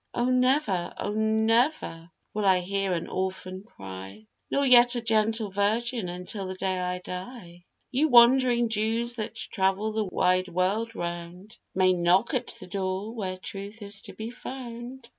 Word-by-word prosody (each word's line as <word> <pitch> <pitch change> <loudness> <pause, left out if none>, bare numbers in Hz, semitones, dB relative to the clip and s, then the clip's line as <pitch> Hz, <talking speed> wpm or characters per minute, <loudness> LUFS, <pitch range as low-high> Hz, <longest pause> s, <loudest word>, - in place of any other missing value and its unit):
O, 240 - +1
never, 255 -8 +2
O, 205 - -3
never 220 - +1 0.2
will 210 - -2
I 190 -2 +4
hear 195 +1 -1
an 170 - -3
orphan 185 0 -4
cry, 95 - -10 0.2
Nor 280 - +1
yet 245 -1 +7
a 240 - -1
gentle 220 -1 +1
virgin 215 +1 0
until 180 +3 -5
the 185 - -5
day 185 0 -1
I 180 0 -2
die; 180 -1 -8 0.3
You 280 +5 +2
wandering 240 -1 +6
Jews 225 +2 +1
that 215 0 -4
travel 200 0 0
the 215 0 -1
wide 185 0 +1
world 195 +6 -1
round, 175 +4 -6 0.2
May 185 0 +4
knock 180 - +2
at 250 -2 0
the - - -9
door 190 +3 -3
where 190 -5 -4
truth 200 +3 -7
is 200 0 -6
to - - -9
be 220 +2 -6
found. 245 0 -8
205 Hz, 160 wpm, -27 LUFS, 185-235 Hz, 0.3 s, yet